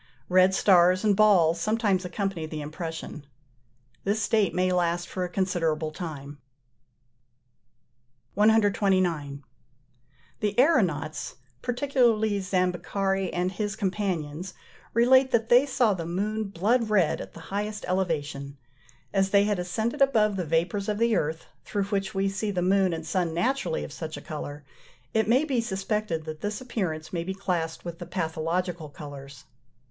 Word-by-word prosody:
Red 185 Hz, +1 st, +5 dB
stars 185 Hz, -1 st, +5 dB
and 210 Hz, -2 st, +3 dB
balls 175 Hz, -6 st, +4 dB
sometimes 210 Hz, -2 st, +1 dB
accompany 180 Hz, -2 st, -3 dB
the 155 Hz, -1 st, -5 dB
impression. 160 Hz, -1 st, -6 dB, 0.8 s
This 205 Hz, +2 st, 0 dB
state 215 Hz, -3 st, +2 dB
may 185 Hz, 0 st, +1 dB
last 175 Hz, -1 st, 0 dB
for 185 Hz, -, -3 dB
a 180 Hz, -, -3 dB
considerable 165 Hz, -4 st, -1 dB
time. 145 Hz, -4 st, -7 dB, 1.9 s
129. 190 Hz, -9 st, +2 dB, 1.0 s
The 210 Hz, -1 st, -1 dB
aëronauts, 180 Hz, -, +2 dB, 0.3 s
particularly 240 Hz, -5 st, +1 dB
Zambeccari 190 Hz, +1 st, -1 dB
and 180 Hz, +1 st, -1 dB
his 205 Hz, +1 st, -3 dB
companions, 185 Hz, -5 st, -3 dB, 0.4 s
relate 260 Hz, +3 st, +5 dB
that 225 Hz, -3 st, +1 dB
they 250 Hz, +4 st, +6 dB
saw 245 Hz, -6 st, +2 dB
the 170 Hz, -3 st, -5 dB
moon 210 Hz, +5 st, -2 dB
blood 215 Hz, +5 st, +1 dB
red 190 Hz, -7 st, +2 dB
at -, -, -10 dB
the -, -, -9 dB
highest 210 Hz, +1 st, -3 dB
elevation. 150 Hz, -6 st, -2 dB, 0.6 s
As 195 Hz, -1 st, +2 dB
they 200 Hz, 0 st, +5 dB
had 205 Hz, -2 st, 0 dB
ascended 220 Hz, +8 st, -2 dB
above 220 Hz, -7 st, +4 dB
the 180 Hz, -2 st, -2 dB
vapours 175 Hz, +6 st, 0 dB
of 210 Hz, -, 0 dB
the 230 Hz, 0 st, +2 dB
earth, 160 Hz, -2 st, -1 dB, 0.2 s
through 205 Hz, -1 st, -2 dB
which 195 Hz, -1 st, -2 dB
we 195 Hz, 0 st, +1 dB
see 195 Hz, +2 st, -2 dB
the 180 Hz, -3 st, -1 dB
moon 190 Hz, 0 st, +3 dB
and 160 Hz, -1 st, -4 dB
sun 170 Hz, -1 st, -1 dB
naturally 230 Hz, -3 st, 0 dB
of -, -, -8 dB
such 155 Hz, -1 st, -6 dB
a -, -, -8 dB
colour, 145 Hz, -1 st, -7 dB, 0.5 s
it 220 Hz, -2 st, +2 dB
may 255 Hz, +5 st, +4 dB
be 260 Hz, -6 st, 0 dB
suspected 195 Hz, -5 st, -2 dB
that 155 Hz, -1 st, -7 dB
this 210 Hz, 0 st, -3 dB
appearance 180 Hz, -11 st, -4 dB
may 170 Hz, -2 st, -1 dB
be 190 Hz, +2 st, -4 dB
classed 175 Hz, -5 st, -2 dB
with 170 Hz, -1 st, -6 dB
the -, -, -7 dB
pathological 165 Hz, 0 st, -2 dB
colours. 140 Hz, -2 st, -10 dB
185 Hz, 145 wpm, -26 LUFS, 165-210 Hz, 1.9 s, they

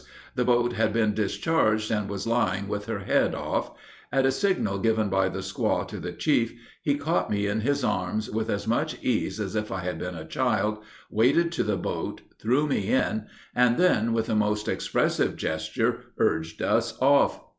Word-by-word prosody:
The 125 Hz, -, +1 dB
boat 120 Hz, 0 st, +2 dB
had 110 Hz, -1 st, +1 dB
been 110 Hz, -2 st, +2 dB
discharged, 110 Hz, 0 st, +1 dB
and 105 Hz, -3 st, -1 dB
was 100 Hz, -1 st, -4 dB
lying 100 Hz, -4 st, +1 dB
with 105 Hz, +1 st, -4 dB
her 110 Hz, -3 st, -3 dB
head -, -, +2 dB
off. -, -, -2 dB, 0.4 s
At 135 Hz, -1 st, +3 dB
a 135 Hz, -, +4 dB
signal 135 Hz, -, 0 dB
given 110 Hz, -1 st, +1 dB
by 95 Hz, 0 st, +2 dB
the 95 Hz, +1 st, -4 dB
squaw 95 Hz, 0 st, -1 dB
to -, -, -6 dB
the -, -, -5 dB
chief, 120 Hz, -6 st, +1 dB, 0.3 s
he 145 Hz, -, +1 dB
caught 155 Hz, +4 st, 0 dB
me 100 Hz, 0 st, 0 dB
up -, -, 0 dB
in 110 Hz, +2 st, -1 dB
his 140 Hz, +3 st, 0 dB
arms, 105 Hz, +2 st, -1 dB
with 110 Hz, +1 st, -2 dB
as 100 Hz, 0 st, -2 dB
much 115 Hz, -, 0 dB
ease 115 Hz, -2 st, 0 dB
as 105 Hz, -1 st, -3 dB
if 105 Hz, 0 st, -2 dB
I 95 Hz, -, -2 dB
had 90 Hz, -3 st, -3 dB
been 90 Hz, +1 st, -4 dB
a 80 Hz, -1 st, -7 dB
child, 105 Hz, +1 st, 0 dB, 0.3 s
waded 140 Hz, +10 st, +3 dB
to 175 Hz, -, 0 dB
the 105 Hz, -2 st, 0 dB
boat, -, -, -4 dB, 0.2 s
threw 130 Hz, +7 st, +2 dB
me 120 Hz, -9 st, -1 dB
in, 110 Hz, -4 st, +1 dB, 0.3 s
and 125 Hz, -1 st, +3 dB
then, 115 Hz, -11 st, +3 dB
with 115 Hz, -1 st, 0 dB
a -, -, -1 dB
most 105 Hz, 0 st, +1 dB
expressive -, -, 0 dB
gesture, 80 Hz, 0 st, -1 dB, 0.2 s
urged 80 Hz, 0 st, 0 dB
us -, -, +1 dB
off. 140 Hz, +2 st, +4 dB
110 Hz, 195 wpm, -26 LUFS, 100-125 Hz, 0.4 s, a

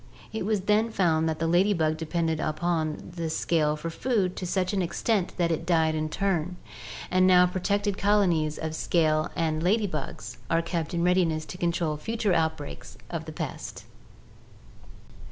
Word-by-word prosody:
It 220 Hz, -3 st, -2 dB
was 215 Hz, -3 st, +1 dB
then 210 Hz, +3 st, +2 dB
found 165 Hz, -6 st, +2 dB
that 160 Hz, -, -2 dB
the 165 Hz, -, -1 dB
lady 180 Hz, +5 st, +3 dB
bug 155 Hz, -3 st, +1 dB
depended 160 Hz, 0 st, -1 dB
upon 155 Hz, 0 st, -1 dB
the 165 Hz, -2 st, -2 dB
scale 155 Hz, -1 st, +1 dB
for 165 Hz, +2 st, -5 dB
food 200 Hz, -3 st, 0 dB
to 180 Hz, -, -3 dB
such 185 Hz, +1 st, 0 dB
an 195 Hz, -, +1 dB
extent 185 Hz, +3 st, 0 dB
that 170 Hz, -2 st, +1 dB
it 160 Hz, -, -1 dB
died 160 Hz, -2 st, +2 dB
in 155 Hz, 0 st, -1 dB
turn, 180 Hz, -1 st, -1 dB, 0.5 s
and 185 Hz, 0 st, +4 dB
now 180 Hz, -1 st, +7 dB
protected 200 Hz, +2 st, -1 dB
colonies 175 Hz, -7 st, +2 dB
of 160 Hz, 0 st, -4 dB
scale 155 Hz, -1 st, +1 dB
and 160 Hz, -1 st, 0 dB
lady 205 Hz, +5 st, +2 dB
bug 195 Hz, -, -5 dB, 0.3 s
are 165 Hz, 0 st, +2 dB
kept 170 Hz, -1 st, -3 dB
in 170 Hz, -, 0 dB
readiness 175 Hz, -3 st, +2 dB
to 180 Hz, -, -8 dB
control 170 Hz, -3 st, 0 dB
future 220 Hz, +3 st, -1 dB
outbreaks 160 Hz, -, -2 dB
of -, -, -4 dB
the -, -, -7 dB
pest! -, -, -6 dB
170 Hz, 170 wpm, -27 LUFS, 160-185 Hz, 0.5 s, now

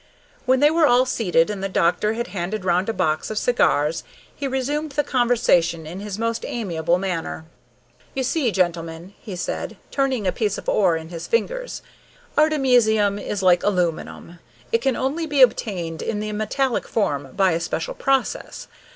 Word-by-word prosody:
When 260 Hz, +1 st, +3 dB
they 295 Hz, +1 st, +6 dB
were 325 Hz, -1 st, +4 dB
all 245 Hz, 0 st, +4 dB
seated, 185 Hz, -8 st, +1 dB
and 195 Hz, -2 st, -5 dB
the 195 Hz, -, -1 dB
doctor 190 Hz, +4 st, +1 dB
had 235 Hz, +1 st, -2 dB
handed 190 Hz, +2 st, -4 dB
round 180 Hz, +3 st, +1 dB
a -, -, +3 dB
box 155 Hz, -6 st, 0 dB
of 215 Hz, -, -4 dB
cigars, 160 Hz, -11 st, +2 dB, 0.3 s
he 280 Hz, -, -3 dB
resumed 280 Hz, +3 st, -2 dB
the 295 Hz, +1 st, +1 dB
conversation 225 Hz, -, +2 dB
in 170 Hz, +5 st, -7 dB
his 205 Hz, -1 st, -5 dB
most 230 Hz, 0 st, -2 dB
amiable 175 Hz, -7 st, -1 dB
manner. 175 Hz, -4 st, -3 dB, 0.7 s
"You 265 Hz, -, 0 dB
see, 265 Hz, 0 st, +1 dB
gentlemen," 170 Hz, -1 st, -2 dB
he 205 Hz, -6 st, -7 dB
said, 175 Hz, -, -4 dB
turning 265 Hz, -6 st, 0 dB
a 185 Hz, -, +2 dB
piece 210 Hz, -2 st, -1 dB
of -, -, -9 dB
ore 180 Hz, -5 st, +3 dB
in 160 Hz, 0 st, -8 dB
his 170 Hz, -1 st, -7 dB
fingers, -, -, -2 dB, 0.5 s
"artemisium 245 Hz, -9 st, +3 dB
is 200 Hz, -1 st, -4 dB
like 180 Hz, -1 st, +5 dB
aluminum. 175 Hz, -2 st, -2 dB, 0.3 s
It 230 Hz, -, +3 dB
can 270 Hz, -1 st, +1 dB
only 305 Hz, +5 st, -1 dB
be 285 Hz, -3 st, +5 dB
obtained 180 Hz, -9 st, 0 dB
in 210 Hz, -, -2 dB
the 215 Hz, 0 st, -3 dB
metallic 220 Hz, +5 st, -1 dB
form 145 Hz, -, -1 dB
by 190 Hz, -2 st, +3 dB
a 165 Hz, -, 0 dB
special 180 Hz, -, -3 dB
process. 270 Hz, -, -1 dB
210 Hz, 170 wpm, -22 LUFS, 175-255 Hz, 0.7 s, they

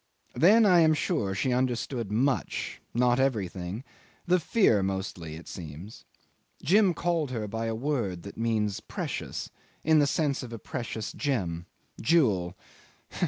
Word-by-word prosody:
Then 215 Hz, +7 st, +6 dB
I 180 Hz, -4 st, +6 dB
am 160 Hz, -1 st, +5 dB
sure 130 Hz, -, -1 dB
she 125 Hz, +5 st, 0 dB
understood 125 Hz, -3 st, -1 dB
much 130 Hz, +5 st, -1 dB
not 125 Hz, +1 st, +2 dB
everything 100 Hz, -5 st, -1 dB, 0.4 s
the 180 Hz, +1 st, +3 dB
fear 160 Hz, -, +3 dB
mostly, 95 Hz, -4 st, -3 dB
it 85 Hz, -, -11 dB
seems. 85 Hz, +5 st, -9 dB, 0.6 s
Jim 195 Hz, 0 st, +4 dB
called 170 Hz, -4 st, 0 dB
her 115 Hz, -4 st, -3 dB
by 115 Hz, +2 st, -3 dB
a 115 Hz, -, -1 dB
word 115 Hz, -, -2 dB
that 100 Hz, -, -9 dB
means 110 Hz, -3 st, 0 dB
precious, -, -, -5 dB, 0.3 s
in 160 Hz, 0 st, +5 dB
the 145 Hz, -, +4 dB
sense 145 Hz, -2 st, 0 dB
of 125 Hz, -, -8 dB
a 115 Hz, -, -5 dB
precious 115 Hz, -3 st, -5 dB
gem 90 Hz, -, -2 dB, 0.3 s
jewel. 100 Hz, -, +2 dB
115 Hz, 140 wpm, -28 LUFS, 100-150 Hz, 0.6 s, Then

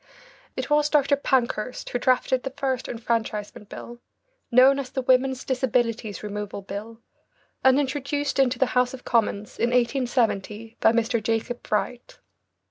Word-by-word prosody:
It -, -, -4 dB
was 295 Hz, 0 st, +3 dB
Dr. 285 Hz, -1 st, +3 dB
Pankhurst 255 Hz, -4 st, -1 dB
who 245 Hz, -, -1 dB
drafted 255 Hz, 0 st, +2 dB
the 270 Hz, -, -4 dB
first 265 Hz, -2 st, -2 dB
enfranchisement 220 Hz, -3 st, -3 dB
bill, 240 Hz, 0 st, -9 dB, 0.5 s
known 260 Hz, +3 st, +6 dB
as 265 Hz, -2 st, -5 dB
the 265 Hz, -, -3 dB
Women's 255 Hz, +1 st, +2 dB
Disabilities 240 Hz, -5 st, -1 dB
Removal 205 Hz, -1 st, -5 dB
Bill, 210 Hz, +4 st, -7 dB, 0.6 s
and 265 Hz, +1 st, +5 dB
introduced 285 Hz, +1 st, -2 dB
into 260 Hz, -2 st, +3 dB
the 265 Hz, -, +3 dB
House 250 Hz, +1 st, +2 dB
of 255 Hz, -, -15 dB
Commons 210 Hz, -3 st, 0 dB
in 235 Hz, -, +2 dB
1870 235 Hz, -3 st, 0 dB
by 225 Hz, -, +5 dB
Mr. 230 Hz, 0 st, +1 dB
Jacob 225 Hz, +2 st, -2 dB
Bright. 235 Hz, +3 st, -3 dB
245 Hz, 140 wpm, -25 LUFS, 225-265 Hz, 0.6 s, known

